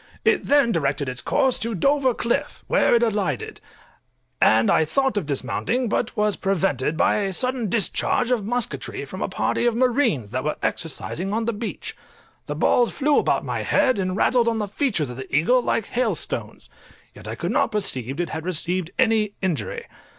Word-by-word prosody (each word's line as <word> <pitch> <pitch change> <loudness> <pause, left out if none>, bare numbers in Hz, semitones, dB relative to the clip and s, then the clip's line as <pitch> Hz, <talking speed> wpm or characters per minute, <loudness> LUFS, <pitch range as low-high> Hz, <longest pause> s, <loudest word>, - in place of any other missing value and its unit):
It - - +2
then 280 -5 +4
directed 145 -5 0
its 125 -1 -1
course 265 -2 +1
to 230 -1 -3
Dover 270 - +2
cliff, 235 - -2
where - - +3
it 235 - +3
alighted, 200 - -2 0.8
and 110 +1 +4
I - - +4
thought 265 - 0
of 195 -8 -1
dismounting, 155 - -1
but 240 +2 -2
was 210 -2 +1
prevented 165 -7 0
by - - +3
a 200 -2 -1
sudden 250 0 -1
discharge 230 +3 +1
of 240 -4 +1
musketry 245 +3 -3
from - - -8
a - - -1
party 240 - 0
of 235 - +1
marines 235 - +1
that 130 +1 -2
were 150 - -1
exercising 170 +4 -3
on 225 +1 -1
the 235 - 0
beach; 220 +1 -6 0.5
the - - -3
balls 240 -1 +3
flew 290 +1 +2
about - - 0
my - - -2
head, 255 -5 +2
and 185 -1 -1
rattled 240 +2 +3
on 230 -1 +1
the 210 -2 -2
feathers 200 - -1
of 125 - -9
the 130 +1 -5
eagle 245 - +4
like 230 -3 0
hail 250 +1 0
stones, - - -6 0.5
yet - - -12
I - - -4
could - - -3
not - - +1
perceive 135 - -1
it 175 -2 -1
had 160 0 -5
received 175 0 0
any 220 -4 +2
injury. 155 - -3
205 Hz, 185 wpm, -23 LUFS, 160-240 Hz, 0.8 s, then